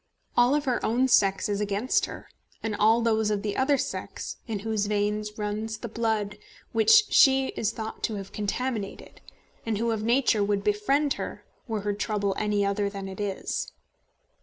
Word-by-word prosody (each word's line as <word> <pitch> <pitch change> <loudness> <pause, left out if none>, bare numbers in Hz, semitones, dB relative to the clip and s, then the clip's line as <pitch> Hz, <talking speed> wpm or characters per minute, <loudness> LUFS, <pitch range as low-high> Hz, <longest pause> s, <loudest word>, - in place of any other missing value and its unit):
All 250 +5 +4
her 260 -5 -1
own 245 +4 +2
sex 195 -6 +3
is 205 0 -1
against 205 +5 +1
her, - - -9 0.4
and 220 -2 -1
all 220 +3 +4
those 220 -2 +2
of 210 -1 -1
the 205 -1 -2
other 275 +2 +3
sex - - -5
in 215 -4 -3
whose 215 -2 0
veins 210 0 -1
runs 215 +1 -3
the 235 - -6
blood 220 -2 -1 0.3
which 425 - +6
she 265 -1 +6
is 220 - -1
thought 220 -1 -6
to 220 - -3
have 195 -1 -7
contaminated, 210 0 -4 0.4
and 225 -2 -1
who, 230 +2 0
of 220 -1 -1
nature, 235 -2 +3
would 200 0 0
befriend 270 +9 +2
her, - - -6 0.2
were 220 -3 -2
her 205 0 -1
trouble 205 -1 -1
any 210 -1 +1
other 200 0 0
than 195 -1 -6
it 190 +1 -8
is. 205 - -3
215 Hz, 175 wpm, -27 LUFS, 205-235 Hz, 0.4 s, which